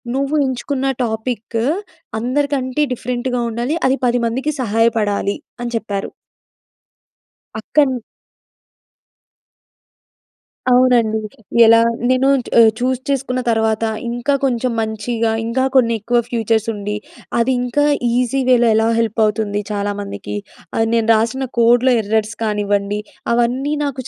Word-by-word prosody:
"నువ్వు 275 Hz, +2 st, 0 dB
ఎంచుకున్న 260 Hz, +1 st, -3 dB, 0.2 s
టాపిక్ 225 Hz, 0 st, -3 dB, 0.6 s
అందరికంటే 260 Hz, +2 st, -1 dB
డిఫరెంట్‌గా 250 Hz, +1 st, -2 dB
ఉండాలి. 240 Hz, +7 st, -2 dB
అది 265 Hz, -, +2 dB
10 245 Hz, 0 st, +2 dB
మందికి 265 Hz, +6 st, -1 dB
సహాయపడాలి" 215 Hz, -3 st, +1 dB, 0.2 s
అని 240 Hz, -, -3 dB
చెప్పారు. 200 Hz, -3 st, -4 dB, 1.5 s
అక్కన్ 275 Hz, +4 st, +2 dB, 2.8 s
అవునండి. 245 Hz, -3 st, +4 dB, 0.5 s
ఎలా 230 Hz, 0 st, +7 dB, 0.3 s
నేనూ 255 Hz, +1 st, +3 dB, 0.2 s
చ్ -, -, -8 dB
ఆహ్, 225 Hz, -1 st, +8 dB
చూస్ 255 Hz, +1 st, 0 dB
చేసుకున్న 265 Hz, -2 st, -1 dB
తర్వాత, 220 Hz, -1 st, +1 dB, 0.3 s
ఇంకా 240 Hz, +4 st, -1 dB
కొంచెం 250 Hz, -1 st, 0 dB
మంచిగా, 225 Hz, +1 st, -1 dB
ఇంకా 240 Hz, +3 st, 0 dB
కొన్ని 235 Hz, -3 st, +4 dB
ఎక్కువ 240 Hz, +3 st, +1 dB
ఫ్యూచర్స్ 225 Hz, -2 st, 0 dB
ఉండి, 210 Hz, 0 st, -4 dB, 0.4 s
అది 235 Hz, +3 st, +2 dB
ఇంకా 250 Hz, +4 st, +1 dB, 0.3 s
ఈజీ 250 Hz, +2 st, +1 dB
వేలో 240 Hz, -2 st, +5 dB
ఎలా 220 Hz, +1 st, +3 dB
హెల్ప్ 225 Hz, -1 st, -1 dB
అవుతుంది 210 Hz, -1 st, -1 dB
చాలామందికి, 200 Hz, -, -4 dB, 0.4 s
అది 225 Hz, 0 st, +2 dB
నేను 230 Hz, -1 st, +1 dB
రాసిన 230 Hz, +5 st, 0 dB, 0.2 s
కోడ్‌లో 240 Hz, +2 st, +4 dB
ఎర్రర్స్ 215 Hz, +1 st, -1 dB
కానివ్వండి, 205 Hz, -1 st, 0 dB, 0.3 s
అవన్నీ 250 Hz, +5 st, 0 dB
నాకు 275 Hz, -2 st, -3 dB
235 Hz, 110 wpm, -18 LUFS, 220-255 Hz, 2.8 s, ఆహ్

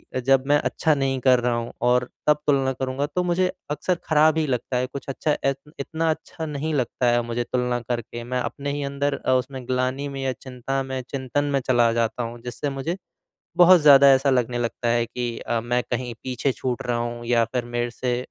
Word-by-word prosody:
अ, -, -, +1 dB
जब 130 Hz, +1 st, +3 dB
मैं 145 Hz, 0 st, +5 dB
अच्छा 160 Hz, -, +2 dB
नहीं 135 Hz, -1 st, 0 dB
कर 125 Hz, -1 st, +5 dB
रहा 120 Hz, 0 st, 0 dB
हूँ 120 Hz, 0 st, -3 dB, 0.2 s
और 125 Hz, 0 st, +2 dB, 0.2 s
तब 150 Hz, -1 st, +5 dB
तुलना 135 Hz, -2 st, +3 dB
करूँगा, 130 Hz, +2 st, -2 dB
तो 180 Hz, +4 st, -2 dB
मुझे 180 Hz, +1 st, +1 dB, 0.2 s
अक्सर 150 Hz, +5 st, 0 dB
ख़राब 155 Hz, 0 st, +4 dB
ही 160 Hz, -, +2 dB
लगता 125 Hz, -1 st, -1 dB
है, 125 Hz, -, +1 dB
कुछ 135 Hz, 0 st, -8 dB
अच्छा 145 Hz, +3 st, -1 dB
ए 135 Hz, -, +3 dB, 0.3 s
इतना 160 Hz, +3 st, -1 dB
अच्छा 160 Hz, +1 st, -6 dB
नहीं 150 Hz, +1 st, -3 dB
लगता 130 Hz, -2 st, -1 dB
है 120 Hz, 0 st, +3 dB
मुझे 120 Hz, +1 st, -2 dB
तुलना 125 Hz, 0 st, -1 dB
करके, 120 Hz, 0 st, -5 dB
मैं 125 Hz, +1 st, -2 dB
अपने 140 Hz, +3 st, -3 dB
ही 145 Hz, 0 st, -3 dB
अंदर 140 Hz, +1 st, -1 dB
अ, -, -, +2 dB
उस 130 Hz, -1 st, +2 dB
मैं 130 Hz, -2 st, -7 dB
ग्लानि 130 Hz, +2 st, -1 dB
में 135 Hz, -, -4 dB
या 135 Hz, -1 st, 0 dB
चिंता 130 Hz, +2 st, -4 dB
में 130 Hz, -1 st, -4 dB
चिंतन 135 Hz, +1 st, -1 dB
में 140 Hz, -, +3 dB
चला 120 Hz, -2 st, +4 dB
जाता 115 Hz, +1 st, 0 dB
हूँ। 120 Hz, +1 st, -6 dB
जिससे 125 Hz, +4 st, -3 dB
मुझे 140 Hz, +6 st, -3 dB, 0.6 s
बहुत 180 Hz, 0 st, +8 dB
ज़्यादा 140 Hz, -2 st, +8 dB
ऐसा 135 Hz, +1 st, +2 dB
लगने 125 Hz, -2 st, +1 dB
लगता 120 Hz, 0 st, -2 dB
है 120 Hz, 0 st, +2 dB
कि 120 Hz, -1 st, -4 dB
अ, 120 Hz, -1 st, -2 dB
मैं 120 Hz, +2 st, 0 dB
कहीं 120 Hz, -1 st, -2 dB
पीछे 130 Hz, +1 st, -1 dB
छूट 125 Hz, +1 st, -3 dB
रहा 120 Hz, -1 st, 0 dB
हूँ 120 Hz, 0 st, -4 dB
या 115 Hz, -1 st, +3 dB
फिर 125 Hz, -2 st, -1 dB
मेरे 120 Hz, 0 st, 0 dB
से 125 Hz, +1 st, -2 dB
130 Hz, 220 wpm, -24 LUFS, 120-140 Hz, 0.6 s, बहुत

